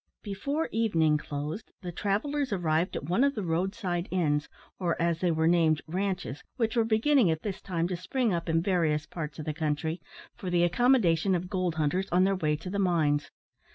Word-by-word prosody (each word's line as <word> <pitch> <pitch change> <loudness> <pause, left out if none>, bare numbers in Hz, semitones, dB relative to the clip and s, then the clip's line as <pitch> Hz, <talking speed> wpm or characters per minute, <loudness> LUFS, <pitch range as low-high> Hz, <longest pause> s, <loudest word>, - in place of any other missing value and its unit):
Before 280 +11 -2
evening 165 -9 +2
closed, 150 +8 -5
the 175 - -4
travellers 240 - -1
arrived 170 -2 0
at - - -3
one 180 - +2
of 280 0 +2
the 210 - -2
road 180 +4 -1
side 180 -5 -2
inns, 150 -5 0 0.3
or, 175 -3 -1
as 170 -1 +1
they 180 - +1
were 160 -1 +2
named, 165 -2 +3
ranches, 185 -3 -3
which 225 -2 0
were 230 - +4
beginning 225 +1 +3
at 160 -1 -1
this 200 -3 -4
time 170 -2 -1
to 185 - -1
spring 215 +5 -1
up 170 0 -2
in 165 0 +2
various 160 -5 +1
parts 150 -3 -6
of 155 - -6
the 155 - -2
country, 160 +2 -2 0.3
for 185 - -5
the 175 -1 +3
accommodation 185 -3 +3
of 180 +1 -4
gold 185 -4 0
hunters 160 +5 0
on 180 +1 +4
their 195 +1 +3
way 155 -4 0
to 165 +5 -7
the 200 - -1
mines. 155 -6 +1
175 Hz, 200 wpm, -28 LUFS, 160-200 Hz, 0.3 s, were